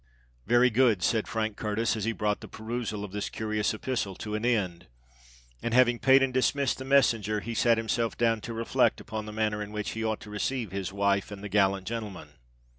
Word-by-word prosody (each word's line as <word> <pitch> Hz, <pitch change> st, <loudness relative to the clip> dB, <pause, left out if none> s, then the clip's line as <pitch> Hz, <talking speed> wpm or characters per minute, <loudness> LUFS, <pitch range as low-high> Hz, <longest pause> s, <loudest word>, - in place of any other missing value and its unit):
"Very 120 Hz, +2 st, +5 dB
good," 110 Hz, -6 st, +3 dB
said 110 Hz, +5 st, +1 dB
Frank 110 Hz, -2 st, -2 dB
Curtis, 110 Hz, +2 st, 0 dB
as 110 Hz, -2 st, -3 dB
he 115 Hz, -, +1 dB
brought 105 Hz, -2 st, -1 dB
the -, -, -8 dB
perusal 110 Hz, -2 st, -4 dB
of 100 Hz, -, -7 dB
this 105 Hz, +1 st, -3 dB
curious 110 Hz, -1 st, -1 dB
epistle 110 Hz, -3 st, -3 dB
to 105 Hz, +3 st, -6 dB
an 105 Hz, +1 st, -2 dB
end: 95 Hz, -8 st, 0 dB, 0.7 s
and 115 Hz, 0 st, -1 dB
having 120 Hz, -2 st, +4 dB
paid 135 Hz, 0 st, +6 dB
and 130 Hz, -1 st, 0 dB
dismissed 135 Hz, +1 st, +1 dB
the 130 Hz, -, -6 dB
messenger, 115 Hz, -6 st, +3 dB
he 115 Hz, +3 st, -5 dB
sate 115 Hz, 0 st, +3 dB
himself 115 Hz, +1 st, -1 dB
down 115 Hz, -2 st, +2 dB
to 115 Hz, -, -6 dB
reflect 115 Hz, 0 st, +1 dB
upon 110 Hz, -1 st, -6 dB
the -, -, -6 dB
manner 105 Hz, -1 st, -1 dB
in 105 Hz, 0 st, -6 dB
which 105 Hz, -1 st, -3 dB
he 110 Hz, -, -4 dB
ought 110 Hz, -1 st, -1 dB
to 105 Hz, -, -10 dB
receive 110 Hz, 0 st, -2 dB
his 95 Hz, -1 st, -3 dB
wife 100 Hz, 0 st, +1 dB
and 100 Hz, -1 st, -9 dB
the 105 Hz, -, -5 dB
gallant 100 Hz, -1 st, +2 dB
gentleman. 110 Hz, -2 st, -5 dB
110 Hz, 210 wpm, -28 LUFS, 105-115 Hz, 0.7 s, paid